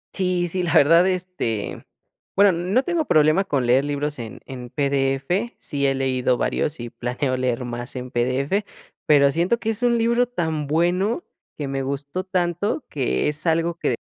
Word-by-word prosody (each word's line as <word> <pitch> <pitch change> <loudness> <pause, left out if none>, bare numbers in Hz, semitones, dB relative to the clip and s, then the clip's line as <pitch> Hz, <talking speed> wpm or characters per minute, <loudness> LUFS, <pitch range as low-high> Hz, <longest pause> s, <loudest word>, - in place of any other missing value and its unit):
Sí, 180 -2 0
sí, 180 +2 -2
la 170 -3 -1
verdad, 165 +5 +6
este, 180 - -3 0.5
bueno, 200 0 +6
no 185 +9 +1
tengo 340 -2 0
problema 155 +5 +4
con 140 -8 0
leer 125 +3 +4
libros 145 0 -2
en 115 -2 -8
en 125 -2 -8
PDF. 140 - 0
Sí 140 -2 -1
he 135 - +1
leído 130 -2 +1
varios, 150 - -1
y 120 -1 -6
planeo 125 +2 -2
leer 125 -1 -1
más 120 +1 -6
en 125 0 -6
PDF, 130 - 0 0.4
pero 140 -2 +5
siento 175 +9 +1
que 225 -1 -1
es 225 +2 -6
un 240 -1 +3
libro 235 +2 +2
tan 160 - -2
bueno 180 - +1 0.3
que 145 -2 -3
me 135 0 -2
gustó 140 +6 -3
tanto, 180 - -1
que 135 -1 0
es 150 +3 -2
algo 165 +1 +1
que 120 - 0
150 Hz, 175 wpm, -22 LUFS, 135-185 Hz, 0.5 s, verdad